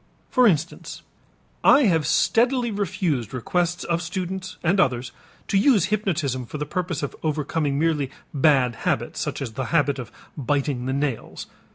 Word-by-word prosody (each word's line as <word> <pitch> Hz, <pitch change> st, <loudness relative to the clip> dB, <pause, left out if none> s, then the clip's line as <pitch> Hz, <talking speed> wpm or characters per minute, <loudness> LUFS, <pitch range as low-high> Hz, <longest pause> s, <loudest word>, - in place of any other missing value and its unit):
For 250 Hz, -2 st, +5 dB
instance, 170 Hz, -3 st, -1 dB, 0.6 s
I 285 Hz, -, +7 dB
have 165 Hz, -, +2 dB
steadily 240 Hz, 0 st, +2 dB
refused 180 Hz, -, -2 dB
requests 175 Hz, +7 st, -1 dB
of 170 Hz, 0 st, -1 dB
students 185 Hz, +1 st, -4 dB
and 175 Hz, +3 st, +2 dB
others 125 Hz, -4 st, +1 dB, 0.4 s
to 195 Hz, -, +2 dB
use 210 Hz, -, +4 dB
hypnotism 150 Hz, -, -1 dB
for 150 Hz, -, -6 dB
the 150 Hz, -, -3 dB
purpose 175 Hz, -5 st, -3 dB
of 140 Hz, -, -4 dB
overcoming 150 Hz, -1 st, -1 dB
merely 150 Hz, -3 st, +1 dB, 0.2 s
bad 135 Hz, -5 st, +3 dB
habits, -, -, -2 dB
such -, -, -3 dB
as 120 Hz, -, -5 dB
the 130 Hz, +3 st, -3 dB
habit 145 Hz, -3 st, +1 dB
of 125 Hz, -, -7 dB, 0.2 s
biting 140 Hz, -2 st, -1 dB
the 130 Hz, -, -1 dB
nails. 140 Hz, -4 st, -3 dB
155 Hz, 155 wpm, -24 LUFS, 140-185 Hz, 0.6 s, I